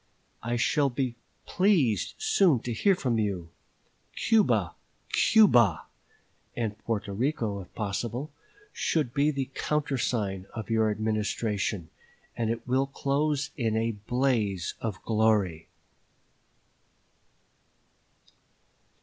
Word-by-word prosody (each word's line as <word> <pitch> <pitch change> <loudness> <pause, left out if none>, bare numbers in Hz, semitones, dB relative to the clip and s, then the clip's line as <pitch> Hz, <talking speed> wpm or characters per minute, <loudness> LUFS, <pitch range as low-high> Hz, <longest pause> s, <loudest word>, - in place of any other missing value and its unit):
I 120 +1 -2
shall 140 +4 +2
be 125 -1 -2 0.3
pleased 170 - +2
soon 195 - +3
to 120 - -3
hear 195 - +3
from 125 -9 0
you. 95 -6 -2 0.7
Cuba! 225 -2 +2 0.4
Cuba! 120 - +5 0.7
(and 110 -3 -2
Porto 105 -3 -3
Rico, 110 -4 -1
if 90 - -13
possible) 115 +7 -3 0.4
should 150 -7 0
be 145 +2 +3
the 140 -2 -3
countersign 120 -10 -1
of 110 0 -5
your 110 -1 +3
Administration, 105 -4 -1 0.4
and 115 -2 -1
it 115 +1 -3
will 130 +2 +2
close 140 +1 -1
in 110 -4 0
a 115 +1 +1
blaze 110 -4 -1
of 110 -4 -3
glory." 105 -7 +1
115 Hz, 100 wpm, -28 LUFS, 105-140 Hz, 0.7 s, Cuba